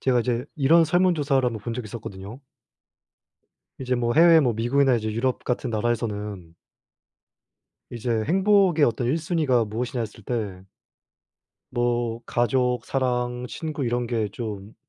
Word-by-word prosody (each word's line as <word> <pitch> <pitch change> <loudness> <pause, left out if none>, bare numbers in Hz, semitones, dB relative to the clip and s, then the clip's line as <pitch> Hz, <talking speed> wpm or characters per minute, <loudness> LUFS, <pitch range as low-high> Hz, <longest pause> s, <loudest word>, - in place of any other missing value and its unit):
제가 125 -2 +2
이제 120 +1 -1
이런 160 +4 +5
설문 180 +2 +3
조사를 140 -3 +1
1 120 - 0
번 110 - -6
본 115 +1 -4
적이 120 -3 -5
있었거든요. 105 +2 -8 1.4
이제 130 -1 -1
뭐 120 -1 0
해외 165 0 +7
뭐 125 -5 +1
미국이나 130 +4 +2
이제 110 -1 -3
유럽 125 +3 -1
같은 125 0 -2
나라에서는 105 -6 -3 1.3
이제 115 -2 -2
행복의 190 -3 +4
어떤 120 +1 0
1 135 - +1
순위가 155 -8 +1
무엇이냐 120 +4 -3
했을 110 -1 -6
때 100 -6 -4 1.0
뭐 120 -1 -1
가족, 125 0 0
사랑, 125 -2 -1
친구 155 -4 -4
이런 120 0 -1
게 115 -3 -1
좀 105 -3 -6
120 Hz, 280 characters per minute, -24 LUFS, 115-135 Hz, 1.4 s, 해외